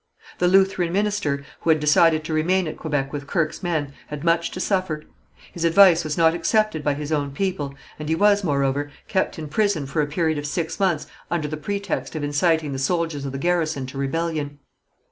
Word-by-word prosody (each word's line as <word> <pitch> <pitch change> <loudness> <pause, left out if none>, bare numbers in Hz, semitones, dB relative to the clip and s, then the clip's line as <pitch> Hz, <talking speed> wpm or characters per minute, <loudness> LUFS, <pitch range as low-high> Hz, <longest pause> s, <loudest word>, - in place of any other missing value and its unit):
The 180 - +3
Lutheran 190 -2 +3
minister, 200 -8 0 0.2
who - - -2
had 160 -1 +5
decided 155 +1 +4
to 160 - -4
remain 175 +3 +2
at 155 - -5
Quebec 145 -3 -2
with 145 -1 -5
Kirke's 165 -3 -1
men, 155 -6 -2
had 150 0 -6
much 170 0 +2
to - - -7
suffer. 185 -6 -1 0.5
His 170 - -5
advice 170 0 +6
was 155 -1 -3
not 165 -1 +5
accepted 175 0 +1
by 145 -1 +1
his 150 +1 -5
own 145 -2 0
people, 150 -6 -2 0.2
and 150 0 -5
he 160 - +2
was, 205 +2 +4
moreover, 140 -2 0 0.2
kept 190 -2 0
in 155 -1 -5
prison 200 -2 +1
for 145 +3 -1
a 145 - 0
period 160 0 0
of 145 - -4
six 165 +2 -3
months 180 -6 +1 0.2
under 160 -3 -1
the 155 - -4
pretext 200 +3 -3
of 155 - -3
inciting 150 +1 +1
the 135 - -3
soldiers 160 -1 -1
of 135 - -3
the 135 - -4
garrison 160 -3 0
to 130 +1 -8
rebellion. 150 0 -2
160 Hz, 205 wpm, -23 LUFS, 145-175 Hz, 0.5 s, advice